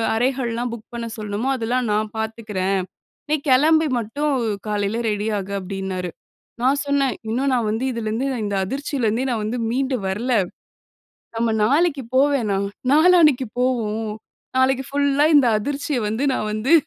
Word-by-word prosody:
அறைகள்லாம் 245 0 0
book 230 -1 -10
பண்ண 235 -1 -4
சொல்லணுமோ, 210 +3 -3
அதெல்லாம் 240 +1 -1
நான் 210 0 0
பாத்துக்கிறேன். 215 -4 -2 0.5
நீ - - +4 0.2
கெளம்பி 315 +5 +5
மட்டும் 285 +7 -1 0.4
காலையில 210 +2 -1
ரெடி 210 +1 -1
ஆகு." 200 0 -5
அப்படீன்னாரு. 190 -1 -4 0.5
நா 250 - +3 0.2
சொன்னேன், 275 -3 +1
"இன்னும் 260 +5 0
நா 255 - +3
வந்து 225 +4 -1
இதுலிருந்து, 230 +2 -2 0.2
இந்த 205 -1 -1
அதிர்ச்சியிலருந்தே 255 0 -1
நா - - +1
வந்து 225 +4 -2
மீண்டு 260 +2 0
வரல. 225 +7 -1 1.0
நம்ம 230 0 +1
நாளைக்கு 285 +3 +2
போ 260 - +6
வேணாம். 200 -6 0 0.3
நாளானைக்கு 310 -5 +5
போவோம். 225 -4 0 0.5
நாளைக்கு 265 0 +2
ஃபுல்லா, 285 0 +2
இந்த 275 -3 +5
அதிர்ச்சிய 285 +4 -2
வந்து 220 +6 -1
நா - - -1
வந்து" 215 +7 0
235 Hz, 140 wpm, -22 LUFS, 215-270 Hz, 1.0 s, போ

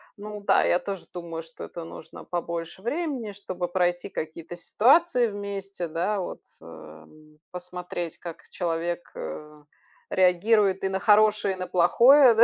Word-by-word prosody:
ну 210 -1 -7
да, 200 - +4
я 175 - +3
тоже 195 -2 -6
думаю, 170 -2 -6
что 165 0 -10
это 170 - -8
нужно 165 - -10
побольше 170 0 -4
времени, 260 - -3
чтобы 185 -3 -4
пройти 175 -1 0
какие-то 165 -1 -6
ситуации 245 - +4
вместе, 200 -3 -5
да, 185 +6 -1
вот, - - -6 0.2
эм, 80 - -14
посмотреть, 180 -2 -5
как 170 -2 -8
человек, 170 0 -2
э, 150 0 -8 0.5
реагирует 190 +2 +3
и 190 - +1
на 190 0 -1
хорошее, 210 -1 +4
и - - -12
на 185 0 -4
плохое, 240 +9 +6
да. 225 - +8
180 Hz, 145 wpm, -26 LUFS, 170-205 Hz, 0.5 s, да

